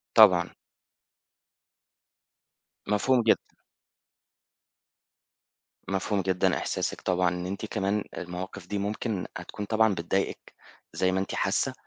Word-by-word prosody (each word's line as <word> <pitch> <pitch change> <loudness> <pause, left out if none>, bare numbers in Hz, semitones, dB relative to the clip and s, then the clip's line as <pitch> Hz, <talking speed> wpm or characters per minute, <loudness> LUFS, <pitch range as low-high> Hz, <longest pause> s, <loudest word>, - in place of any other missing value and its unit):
طبعًا. 95 -6 +7 2.4
مفهوم 120 +5 +3
جدًا. 110 - +6 2.5
مفهوم 95 +2 0
جدًا 95 -1 +1
إحساسِك - - -2
طبعًا 90 -1 +2
إن 90 0 -4
أنتِ 100 +3 -4
كمان 105 -1 -1
المواقِف 90 +1 -6
دي 105 - -2
ممكن 105 0 -2
هتكون 105 - -6
طبعًا 110 0 +3
بتضايقِك 95 +2 -2 0.4
زي 95 0 +1
ما 95 - +1
أنتِ 95 - -3
حاسّة، - - +1
95 Hz, 100 wpm, -28 LUFS, 90-105 Hz, 2.5 s, طبعًا